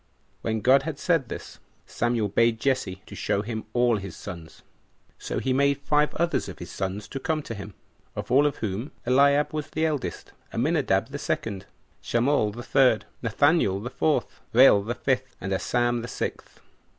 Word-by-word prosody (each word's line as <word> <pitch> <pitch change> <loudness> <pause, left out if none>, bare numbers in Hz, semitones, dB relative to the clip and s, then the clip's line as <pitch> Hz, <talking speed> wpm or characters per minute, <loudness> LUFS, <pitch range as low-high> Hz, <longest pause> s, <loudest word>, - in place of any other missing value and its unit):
When 110 -1 -1
God 130 +5 +5
had 150 0 -5
said 160 -5 +1
this, - - -8 0.3
Samuel 120 -2 0
bade 115 +3 +2
Jesse 95 -8 -1
to - - -12
show 100 - -1
him 110 0 -5
all 120 -1 +3
his 95 -3 -7
sons. 85 -5 -9 0.6
So - - -4
he 130 - 0
made 140 +1 +3
five 150 +1 +2
others 170 +1 0
of - - -9
his - - -9
sons 100 +3 -4
to 135 - -5
come 160 0 -1
to 115 - -6
him; 100 -2 -8 0.4
of - - -5
all 140 +3 +5
of 145 - -2
whom 110 +5 -4
Eliab 140 +4 +4
was 155 -1 -3
the 160 +1 0
eldest, 150 -4 -3 0.2
Aminadab - - +1
the - - -6
second, 100 -4 -3 0.3
Shammall 120 -1 +2
the 120 +3 -8
third, 130 -4 +3 0.2
Nathaniel 115 - +2
the 120 +5 -6
fourth, 150 -6 0
Rael 120 -4 +7
the 115 +4 -3
fifth, 130 -1 -1
and 95 0 -3
Asam 120 +4 0
the 120 - -6
sixth. - - -5
120 Hz, 175 wpm, -26 LUFS, 105-140 Hz, 0.6 s, Rael